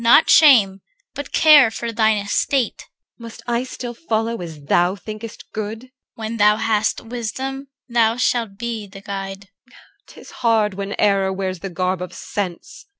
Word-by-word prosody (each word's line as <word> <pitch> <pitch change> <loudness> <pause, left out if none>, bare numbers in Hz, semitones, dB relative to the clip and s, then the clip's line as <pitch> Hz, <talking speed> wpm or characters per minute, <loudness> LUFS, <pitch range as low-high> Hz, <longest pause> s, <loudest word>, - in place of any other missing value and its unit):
Not 235 +7 +6
shame, 215 -11 +6 0.3
but 285 - -7
care 300 -6 +7
for 230 +1 -5
thine 220 -1 +2
estate. 225 +5 0
EL. - - -15 0.4
Must 230 -1 -10
I 240 0 0
still 250 -1 -7
follow 230 - -2
as 160 -4 -8
thou 175 +5 +2
thinkest 215 +2 -9
good? 215 +1 -4
CHR. - - -14 0.3
When 225 +1 -5
thou 210 0 +5
hast 220 -1 0
wisdom, 260 +4 -5 0.2
thou 230 -2 +2
shalt 230 -5 0
be 230 -2 -4
the 195 0 -12
guide. 195 0 -6 0.2
EL. - - -23 0.3
'Tis - - -14
hard 220 -4 +1
when 200 +1 -5
error 195 -2 +2
wears 190 -1 -3
the 195 - -6
garb 185 0 -2
of 180 0 -6
sense. 205 - -6
220 Hz, 165 wpm, -20 LUFS, 195-235 Hz, 0.4 s, care